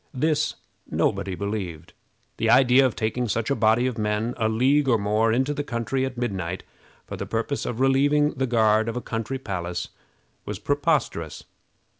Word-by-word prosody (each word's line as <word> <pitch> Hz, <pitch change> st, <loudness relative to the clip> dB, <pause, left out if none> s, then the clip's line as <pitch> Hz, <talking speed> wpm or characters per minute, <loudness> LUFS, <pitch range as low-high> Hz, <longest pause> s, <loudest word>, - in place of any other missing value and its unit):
This 155 Hz, +3 st, +1 dB, 0.3 s
nobody 95 Hz, -1 st, 0 dB
believed. 100 Hz, -6 st, -5 dB, 0.4 s
The -, -, 0 dB
idea 130 Hz, 0 st, +6 dB
of 125 Hz, -, -5 dB
taking 115 Hz, +3 st, -1 dB
such 115 Hz, +5 st, -1 dB
a -, -, +3 dB
body 110 Hz, +2 st, +3 dB
of 125 Hz, -3 st, -2 dB
men 105 Hz, +3 st, -1 dB
a 110 Hz, -1 st, +1 dB
league 135 Hz, +6 st, +2 dB
or 120 Hz, -3 st, +4 dB
more 105 Hz, +2 st, +1 dB
into 130 Hz, +5 st, +1 dB
the 145 Hz, 0 st, -3 dB
country 130 Hz, +1 st, -2 dB
at 125 Hz, -2 st, -8 dB
midnight 95 Hz, -7 st, -3 dB, 0.4 s
for -, -, -6 dB
the -, -, -5 dB
purpose 115 Hz, +5 st, -2 dB
of 120 Hz, -, -4 dB
relieving 145 Hz, +3 st, +3 dB
the 130 Hz, 0 st, -2 dB
guard 110 Hz, -1 st, +3 dB
of 115 Hz, -, -4 dB
a -, -, 0 dB
country 115 Hz, +4 st, -3 dB
palace 90 Hz, -7 st, -4 dB, 0.5 s
was -, -, -5 dB
preposterous. -, -, -1 dB
115 Hz, 170 wpm, -24 LUFS, 105-130 Hz, 0.5 s, idea